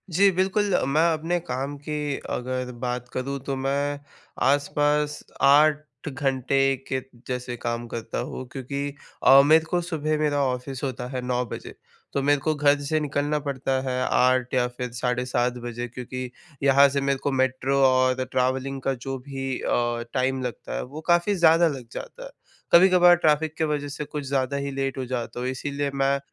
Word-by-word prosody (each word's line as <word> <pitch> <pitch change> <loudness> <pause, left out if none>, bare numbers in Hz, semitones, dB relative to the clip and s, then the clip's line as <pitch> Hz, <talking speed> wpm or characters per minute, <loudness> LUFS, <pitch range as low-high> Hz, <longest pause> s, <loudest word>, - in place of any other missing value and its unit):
जी, 200 +1 +6
बिल्कुल। 190 +2 +1
मैं 150 +3 +2
अपने 165 +3 -1
काम 135 -1 -4
की 150 -1 -3 0.2
अगर 125 0 -3
बात 125 0 -3
करूँ 140 +2 -3
तो 135 - -2
मैं 140 +2 -1 0.5
आसपास 145 +1 +1 0.2
8 150 +2 +6 0.3
घंटे 135 0 0 0.3
के 130 -1 -1 0.3
जैसे 125 -1 -4
काम 120 0 -3
करता 115 -1 -5
हूँ। 130 - -6
क्योंकि 140 +1 -4 0.3
अ, 135 +1 +9
मेरे 160 +2 +5
को 175 +1 0
सुबह 155 -3 -1
मेरा 145 -2 +1
ऑफिस 130 +1 -3
होता 125 -2 -3
है 125 - -1
9:00 125 0 -1
बजे - - -8 0.4
तो 140 - 0
मेरे 145 0 +3
को 155 +3 +1
घर 145 0 +3
से 155 +2 0
निकलना 145 +1 -1
पडता 135 -1 -2 0.2
है 125 0 -1
8:00 125 0 +2
या 125 -1 +2
फिर 125 -1 -4
7:30 125 0 0
बजे 120 0 -4
क्योंकि 125 +1 -6 0.3
यहाँ 140 0 +6
से 140 +1 -1
मेरे 140 0 +1
को 145 - 0
मेट्रो 130 +1 +1
और 130 0 +2
ट्रैवलिंग 130 +1 0
का 135 - 0
जो 135 +1 -5
भी 135 -1 -3
अ, 120 -1 0
टाइम 130 +1 0
लगता 125 - -5
है - - -2
वो 145 +5 -9
काफ़ी 175 +4 +3
ज़्यादा 170 -1 +5
लग 130 -6 -5
जाता - - -8
है। - - -8 0.4
कभी-कभार 180 0 +7
ट्रैफिक 155 -2 +2
की - - 0
वजह 145 -1 -2
से 145 +1 -5
कुछ 150 0 -5
ज़्यादा 135 0 0
ही 140 0 -3
लेट 135 0 -2
हो 130 - -3
जाता 120 -1 -4
हूँ। 125 - -2
इसीलिए 140 +2 -3
मैं 140 0 +1
135 Hz, 180 wpm, -25 LUFS, 130-150 Hz, 0.5 s, अ